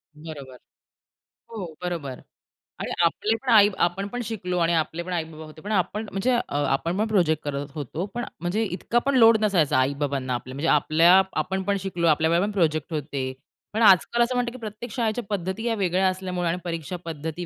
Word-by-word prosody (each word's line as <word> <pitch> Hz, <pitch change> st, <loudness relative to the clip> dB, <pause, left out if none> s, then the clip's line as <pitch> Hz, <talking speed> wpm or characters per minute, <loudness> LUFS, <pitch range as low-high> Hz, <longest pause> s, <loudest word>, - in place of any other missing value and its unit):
बरोबर. 145 Hz, -5 st, -9 dB, 0.9 s
हो, 210 Hz, -6 st, -5 dB, 0.2 s
बरोबर. 160 Hz, -8 st, -4 dB, 0.6 s
आणि -, -, -3 dB
आपले 215 Hz, +6 st, +1 dB
पण 265 Hz, -, -4 dB
आई 205 Hz, -1 st, +7 dB, 0.2 s
आपणपण 195 Hz, +7 st, -3 dB
शिकलो 180 Hz, -5 st, -3 dB
आणि 170 Hz, 0 st, +2 dB
आपले 165 Hz, +1 st, -1 dB
पण 180 Hz, 0 st, -5 dB
आई-बाबा 160 Hz, -2 st, -4 dB
होते. 155 Hz, 0 st, -13 dB
पण 210 Hz, -, -6 dB
आपण 210 Hz, +2 st, 0 dB
म्हणजे 195 Hz, +7 st, 0 dB
अ, 240 Hz, -, +3 dB, 0.3 s
आपणपण 175 Hz, +10 st, 0 dB
प्रोजेक्ट 170 Hz, -7 st, +2 dB
करत 145 Hz, -1 st, -3 dB
होतो, 155 Hz, +5 st, -4 dB
पण 240 Hz, 0 st, -3 dB, 0.2 s
म्हणजे 190 Hz, +6 st, 0 dB
इतका 215 Hz, +4 st, 0 dB
पण 280 Hz, -1 st, +2 dB
लोड 225 Hz, -1 st, +7 dB
नसायचा 175 Hz, -11 st, +2 dB
आई-बाबांना 135 Hz, -1 st, 0 dB
आपल्या, 130 Hz, +2 st, -5 dB
म्हणजे 155 Hz, +4 st, -2 dB
आपल्या 165 Hz, +5 st, +5 dB, 0.2 s
आपणपण 190 Hz, +1 st, -1 dB
शिकलो, 175 Hz, -3 st, -1 dB
आपल्या 160 Hz, +1 st, +3 dB
वेळेला 175 Hz, +4 st, +3 dB
पण 210 Hz, -, -3 dB
प्रोजेक्ट 160 Hz, -4 st, 0 dB
होते, 140 Hz, -3 st, -3 dB, 0.4 s
पण 220 Hz, -, -1 dB
आजकाल 210 Hz, +3 st, +5 dB
असं 250 Hz, +1 st, -1 dB
म्हणतात 245 Hz, -1 st, 0 dB
की 255 Hz, -, -9 dB
प्रत्येक 215 Hz, +1 st, -7 dB
शाळेच्या 235 Hz, -1 st, -1 dB
पद्धती 190 Hz, +2 st, -3 dB
या 225 Hz, -, +1 dB
वेगळ्या 190 Hz, -1 st, +1 dB
असल्यामुळे 185 Hz, -2 st, -2 dB
आणि 175 Hz, -, -1 dB
परीक्षा 170 Hz, +1 st, -4 dB
पद्धती 160 Hz, +2 st, -5 dB
180 Hz, 180 wpm, -25 LUFS, 155-210 Hz, 0.9 s, आई